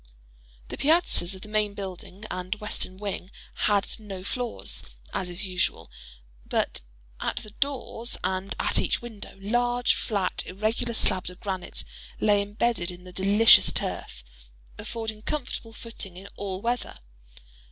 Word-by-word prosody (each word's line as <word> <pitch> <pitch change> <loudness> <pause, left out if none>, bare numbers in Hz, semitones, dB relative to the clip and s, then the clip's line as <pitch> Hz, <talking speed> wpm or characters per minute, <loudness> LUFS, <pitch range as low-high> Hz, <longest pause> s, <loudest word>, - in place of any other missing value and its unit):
The - - -4
piazzas 290 - +4
of 190 - -11
the - - -8
main 210 -1 +2
building 195 +1 -6
and 185 +2 -2
western 210 -3 -3
wing 195 -2 -3 0.4
had 200 -1 +4
no 195 -4 -6
floors, 245 +3 -2 0.3
as 190 -2 -1
is 175 +4 -3
usual; 180 - 0 0.5
but - - 0 0.4
at - - 0
the 215 - -9
doors 245 -2 -1
and 185 +1 0
at - - +4
each - - +2
window, 220 -5 -6
large, 240 +4 +3
flat 200 -4 0
irregular 215 +4 0
slabs 185 -4 +3
of 180 - -10
granite 190 -2 -2 0.4
lay 205 -1 +5
imbedded 205 -2 0
in 180 0 -7
the 180 0 -11
delicious 200 +4 +7
turf, - - -2 0.5
affording 220 - -4
comfortable 250 -3 -3
footing 220 -5 -8
in 195 +2 -8
all 195 -1 -3
weather. 240 - -1
205 Hz, 140 wpm, -28 LUFS, 185-225 Hz, 0.5 s, delicious